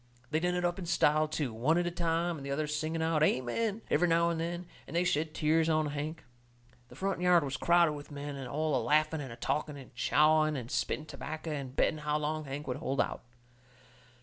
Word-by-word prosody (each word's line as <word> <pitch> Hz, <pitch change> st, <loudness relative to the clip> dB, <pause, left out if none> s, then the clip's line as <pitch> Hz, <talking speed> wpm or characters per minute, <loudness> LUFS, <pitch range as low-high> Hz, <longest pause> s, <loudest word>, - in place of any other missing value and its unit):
They 155 Hz, -, +2 dB
done 180 Hz, +1 st, 0 dB
it 180 Hz, 0 st, 0 dB
up 175 Hz, +2 st, -1 dB
in 175 Hz, -, -5 dB
style, 155 Hz, -2 st, +3 dB
too, 150 Hz, -5 st, -2 dB
one 135 Hz, +9 st, +2 dB
at 175 Hz, -, +1 dB
a 175 Hz, -, -1 dB
time, 170 Hz, 0 st, 0 dB
and 140 Hz, -, -9 dB
the 140 Hz, -, -6 dB
others 150 Hz, +2 st, -1 dB
singing 160 Hz, +2 st, -1 dB
out, 160 Hz, -1 st, +1 dB
"Amen!" 195 Hz, -, +1 dB
every 175 Hz, +4 st, +4 dB
now 170 Hz, 0 st, +3 dB
and 165 Hz, -, -2 dB
then, 175 Hz, +2 st, -3 dB, 0.2 s
and -, -, -8 dB
they 175 Hz, -, +3 dB
shed 160 Hz, -3 st, 0 dB
tears 160 Hz, +1 st, +2 dB
down 155 Hz, -1 st, +2 dB
onto 145 Hz, -, -3 dB
Hank. 150 Hz, +2 st, -4 dB, 0.6 s
The -, -, -14 dB
front 195 Hz, -2 st, -2 dB
yard 180 Hz, -2 st, +5 dB
was 135 Hz, -1 st, -3 dB
crowded 170 Hz, +2 st, +4 dB
with 145 Hz, -1 st, -8 dB
men, 140 Hz, -2 st, -6 dB
all 150 Hz, +3 st, 0 dB
a 125 Hz, -, +2 dB
laughing 155 Hz, +4 st, +2 dB
and 135 Hz, -4 st, -7 dB
a -, -, -7 dB
talking 150 Hz, +4 st, -2 dB
and 135 Hz, -1 st, -12 dB
chawing 155 Hz, +4 st, +3 dB
and 120 Hz, -2 st, -6 dB
spitting 155 Hz, -, -1 dB
tobacco 155 Hz, +1 st, -6 dB
and 140 Hz, -3 st, -5 dB
betting 155 Hz, -, +2 dB
how 150 Hz, 0 st, 0 dB
long 155 Hz, +1 st, -2 dB
Hank 140 Hz, +2 st, -5 dB
would 125 Hz, -2 st, -3 dB
hold 140 Hz, -2 st, -2 dB
out. -, -, 0 dB
155 Hz, 230 wpm, -31 LUFS, 145-170 Hz, 0.6 s, yard